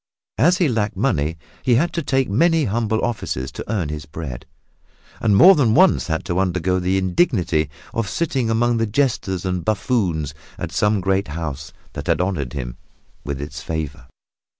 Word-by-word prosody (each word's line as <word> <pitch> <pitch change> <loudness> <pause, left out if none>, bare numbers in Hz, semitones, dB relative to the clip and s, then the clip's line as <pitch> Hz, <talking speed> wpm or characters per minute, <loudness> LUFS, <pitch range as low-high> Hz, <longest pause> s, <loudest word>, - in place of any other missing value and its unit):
As 175 +9 +5
he 175 - +3
lacked 110 -5 -1
money, 85 - 0 0.2
he 125 - +3
had 165 +8 +1
to 170 - -1
take 135 -3 +1
many 165 - +3
humble 110 0 0
offices 65 - -3
to - - -7
earn 95 -9 -1
his 75 0 -6
bread, 70 -5 -7 0.7
and 105 -3 +3
more 190 - +9
than 125 - +3
once 185 +2 +4
had 80 -1 -2
to 90 +1 -1
undergo 90 -1 +1
the 90 +1 +1
indignity 90 - +1 0.2
of 115 -4 -1
sitting 135 -8 -1
among 120 +1 +2
the 115 0 +1
jesters 105 -6 0
and 90 -2 -1
buffoons 100 - 0 0.2
at - - -5
some 105 -1 +1
great 95 +1 +1
house 75 -1 -5 0.2
that 70 - -6
had 85 -1 +2
honored 90 -9 -1
him - - -5 0.5
with 70 -1 -4
its 70 0 -6
favor. 75 -5 -5
95 Hz, 175 wpm, -21 LUFS, 80-120 Hz, 0.7 s, more